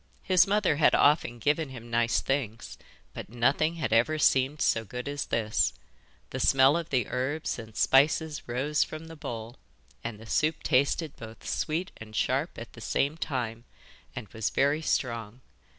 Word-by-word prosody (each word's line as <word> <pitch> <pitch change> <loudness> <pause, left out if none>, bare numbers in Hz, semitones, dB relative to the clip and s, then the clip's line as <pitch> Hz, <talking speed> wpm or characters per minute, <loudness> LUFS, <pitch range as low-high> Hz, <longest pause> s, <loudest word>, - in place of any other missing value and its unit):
His 185 -1 +4
mother 200 -6 +2
had 155 - +5
often 145 -5 +3
given 150 +5 0
him 120 -3 -10
nice 115 0 +2
things, 125 -5 -3 0.3
but - - -8
nothing 135 +8 +1
had 155 -9 -2
ever 125 +8 +3
seemed 135 0 +2
so 115 - +2
good 125 +4 -7
as 145 0 -3
this. 110 -2 +1 0.6
The - - -4
smell 135 +2 +5
of 170 -1 -3
the 130 -3 +1
herbs 130 +3 -2
and 110 -1 -10
spices 150 +3 +2
rose 135 +5 +1
from 155 +1 -8
the 165 - -9
bowl, 115 -4 -7 0.5
and 115 -3 -5
the 110 - -12
soup 155 +7 0
tasted 140 +3 +1
both 115 0 -10
sweet 170 +5 -2
and 110 -1 -11
sharp - - 0
at - - -9
the - - -12
same 145 +3 0
time, 120 -7 -3 0.5
and 115 - -6
was 110 +2 -2
very 145 +3 +1
strong. 115 -5 -2
135 Hz, 165 wpm, -28 LUFS, 115-155 Hz, 0.6 s, had